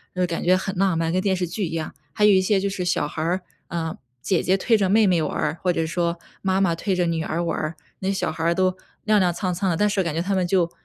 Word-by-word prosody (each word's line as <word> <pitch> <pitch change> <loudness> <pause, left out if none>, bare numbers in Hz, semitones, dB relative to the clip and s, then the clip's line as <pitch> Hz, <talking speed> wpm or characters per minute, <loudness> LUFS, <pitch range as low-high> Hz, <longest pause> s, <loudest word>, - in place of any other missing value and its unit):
就 185 - -1
是 180 - +2
感 170 -1 -3
觉 180 +1 +5
很 190 0 -3
浪 190 -3 +2
漫， 165 0 0
跟 185 - +2
电 195 -1 +1
视 180 -1 -1
剧 185 +4 -2
一 160 - -7
样。 160 -1 -4 0.2
还 210 - 0
有 210 - +7
一 190 -1 +5
些 195 +1 +2
就 200 - 0
是 190 -2 -3
小 170 -4 +1
孩 155 - -5
儿， 175 +4 0 0.3
嗯， 165 -1 -3 0.2
姐 185 -4 +1
姐 185 - +2
推 225 +4 +3
着 195 -3 +1
妹 215 +2 +5
妹 180 -4 +3
玩 155 - -2
儿， 155 +2 -1
或 180 -1 +1
者 165 - 0
说 170 +1 -1 0.2
妈 190 0 +1
妈 185 -3 +3
推 190 +3 -1
着 180 -1 +1
女 165 -1 -1
儿 170 +1 -2
玩 170 - -1
儿， 155 +2 -3 0.2
那 190 0 -1
小 190 -4 -1
孩 165 +1 0
都 185 0 +3 0.3
踉 215 -1 +4
踉 180 -1 +3
跄跄 185 +2 -1
的。 170 - +1
但 210 - +3
是 200 -1 +1
感 170 -3 -3
觉 165 - 0
他 195 +3 -1
们 185 -1 +1
就 175 -2 +2
180 Hz, 320 characters per minute, -23 LUFS, 165-190 Hz, 0.3 s, 有